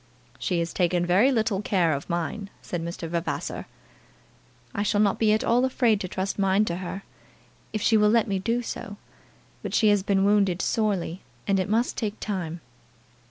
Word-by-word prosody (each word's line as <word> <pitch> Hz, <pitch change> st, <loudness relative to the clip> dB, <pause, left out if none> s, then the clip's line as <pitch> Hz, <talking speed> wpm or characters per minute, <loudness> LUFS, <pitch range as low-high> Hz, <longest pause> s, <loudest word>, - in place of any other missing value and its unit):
"She 180 Hz, -, -1 dB
has 170 Hz, 0 st, -1 dB
taken 175 Hz, -1 st, +1 dB
very 195 Hz, +10 st, +4 dB
little 220 Hz, -5 st, +1 dB
care 180 Hz, -6 st, +2 dB
of 140 Hz, -, -5 dB
mine," 175 Hz, +4 st, -3 dB
said 175 Hz, -2 st, -4 dB
Mr. 170 Hz, 0 st, -5 dB
Vavasor. 170 Hz, +1 st, -3 dB, 1.1 s
"I 200 Hz, -, -2 dB
shall 205 Hz, 0 st, +1 dB
not 205 Hz, -2 st, +2 dB
be 220 Hz, -2 st, +4 dB
at 215 Hz, -, +2 dB
all 240 Hz, +2 st, +3 dB
afraid 240 Hz, -5 st, +2 dB
to 185 Hz, -, -3 dB
trust 190 Hz, +2 st, -3 dB
mine 195 Hz, +2 st, +3 dB
to 170 Hz, -3 st, -2 dB
her, 190 Hz, +2 st, -6 dB, 0.7 s
if 215 Hz, -1 st, -3 dB
she 220 Hz, -, +4 dB
will 210 Hz, 0 st, +4 dB
let 230 Hz, 0 st, +3 dB
me 195 Hz, -2 st, 0 dB
do 235 Hz, +5 st, 0 dB
so. 205 Hz, -2 st, -6 dB, 0.6 s
But -, -, -3 dB
she 215 Hz, -, +4 dB
has 205 Hz, -1 st, +4 dB
been 195 Hz, 0 st, +2 dB
wounded 200 Hz, -3 st, +3 dB
sorely, 195 Hz, -6 st, -1 dB, 0.2 s
and 195 Hz, -2 st, +2 dB
it 185 Hz, -, -1 dB
must 230 Hz, +3 st, +1 dB
take 215 Hz, -2 st, -3 dB
time." 175 Hz, -5 st, -4 dB
200 Hz, 185 wpm, -26 LUFS, 180-215 Hz, 1.1 s, very